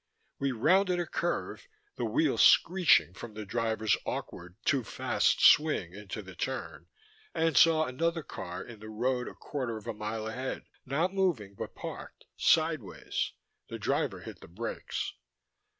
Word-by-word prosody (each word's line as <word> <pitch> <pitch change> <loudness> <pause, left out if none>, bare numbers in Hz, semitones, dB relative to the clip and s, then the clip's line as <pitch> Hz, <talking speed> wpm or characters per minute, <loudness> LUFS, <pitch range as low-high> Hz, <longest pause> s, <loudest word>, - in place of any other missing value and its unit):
We 140 -1 +1
rounded 180 - +3
a 175 - 0
curve, 175 - -3 0.3
the - - -2
wheels - - +2
screeching 175 - +5
from 110 +3 -9
the 110 -1 -6
driver's 110 0 +1
awkward, 90 +1 -5
too 140 -4 +2
fast - - +1
swing 150 - +5
into 105 +1 -7
the 95 0 -11
turn, 130 +9 -4 0.5
and 165 -2 +1
saw 160 +3 +6
another 165 +5 -1
car 90 -6 -6
in 115 -3 -11
the 110 +1 -9
road 125 +3 -1
a - - -8
quarter 125 -6 -4
of 110 - -11
a 115 - -3
mile 110 +1 -4
ahead, 125 +4 -4 0.2
not 160 +8 0
moving 170 - 0
but - - -7
parked - - -8
sideways. 155 - +1 0.4
The - - -5
driver - - -1
hit - - -10
the - - -12
brakes. 105 +8 -4
125 Hz, 150 wpm, -30 LUFS, 105-160 Hz, 0.5 s, saw